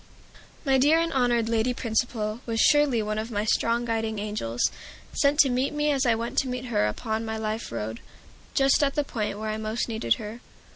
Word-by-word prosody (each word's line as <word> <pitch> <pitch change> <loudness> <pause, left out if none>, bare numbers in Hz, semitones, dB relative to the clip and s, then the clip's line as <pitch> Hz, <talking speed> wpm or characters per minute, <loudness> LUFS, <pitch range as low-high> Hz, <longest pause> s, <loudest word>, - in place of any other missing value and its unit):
My 270 -1 +3
dear 300 +5 +5
and 335 0 0
honored 240 -3 +2
Lady 230 +2 +1
Principal 220 -2 -1
was 225 -1 -1
surely 295 -6 +4
one 215 0 -2
of 220 +2 -4
my 210 -2 -2
strong 230 +2 +1
guiding 225 -1 -1
angels, 200 - -1 0.4
sent 285 0 +2
to 275 - +3
meet 260 +4 0
me 295 0 +1
as 270 -2 +1
I 230 - +4
went 230 +1 -1
to 270 - -1
meet 250 0 -4
her 220 - +1
upon 220 - -3
my 220 0 -3
life 220 +1 -3
road, 110 0 -4 0.6
just 275 +1 +4
at 275 -1 +1
the 295 - +2
point 215 -7 -3
where 215 0 -3
I 215 - -3
most 220 +1 -2
needed 220 - +1
her. 220 +3 -8
230 Hz, 205 wpm, -26 LUFS, 215-260 Hz, 0.6 s, dear